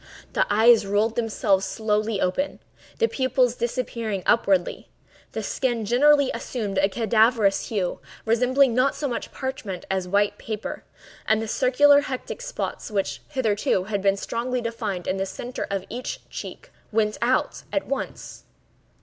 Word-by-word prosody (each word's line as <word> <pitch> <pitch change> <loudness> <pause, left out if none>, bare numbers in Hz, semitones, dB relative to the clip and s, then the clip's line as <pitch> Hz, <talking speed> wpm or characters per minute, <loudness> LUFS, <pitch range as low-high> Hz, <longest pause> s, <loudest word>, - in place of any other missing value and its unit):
The - - +2
eyes 220 +2 +6
rolled 210 +3 +1
themselves 210 -4 +1
slowly 215 +1 -1
open, 275 +12 -1 0.4
the 460 - +3
pupils 260 - +1
disappearing 230 -4 -2
upwardly; 195 -6 +2 0.4
the - - -3
skin 240 -4 -1
generally 280 +5 +4
assumed 205 -6 -3
a 195 +1 +3
cadaverous 220 -1 +2
hue, 195 -5 -2 0.3
resembling 250 +3 +3
not 255 +3 +2
so 290 - -2
much 240 - -4
parchment 260 -9 -5
as 190 -1 -1
white 200 +2 +1
paper; 215 -1 -5 0.4
and 220 0 +3
the 225 - -3
circular 285 +5 +5
hectic 265 - -5
spots - - -4
which, 200 -3 -2
hitherto, 215 -8 +1
had 200 0 -2
been 195 0 +2
strongly 245 +5 -2
defined 220 -6 -3
in 185 - 0
the 190 - -1
centre 245 +6 -5
of 195 -1 -2
each 245 +3 -6
cheek, - - -8 0.2
went 215 -1 +1
out 250 +2 +1
at 295 - -1
once. 275 - -5
225 Hz, 145 wpm, -24 LUFS, 200-255 Hz, 0.4 s, eyes